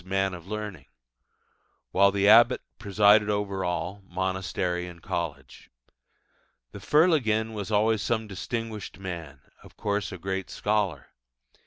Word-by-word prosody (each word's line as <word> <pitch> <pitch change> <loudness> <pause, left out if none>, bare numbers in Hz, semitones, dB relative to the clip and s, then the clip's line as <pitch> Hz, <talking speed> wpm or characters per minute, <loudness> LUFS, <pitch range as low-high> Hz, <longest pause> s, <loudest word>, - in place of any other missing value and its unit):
'Man 95 0 0
of 85 0 -9
learning': 105 -2 -6 1.0
while 100 +1 +5
the 100 +1 +1
abbot 120 +4 +6 0.2
presided 105 +1 +4
over 100 -2 -1
all 90 +2 -3
monastery 95 -1 -2
and 85 -1 -11
college. 75 -6 -5 1.0
The - - -9
Fer 150 - +4
leginn 110 -9 +1
was 105 -2 -5
always 110 0 +2
some 110 -1 -1
distinguished 110 +1 -5
man 85 -8 -7 0.2
of - - -17
course 105 -1 -2
a 95 - -6
great 95 +2 -4
scholar. 105 -9 -1
100 Hz, 130 wpm, -27 LUFS, 90-105 Hz, 1.0 s, abbot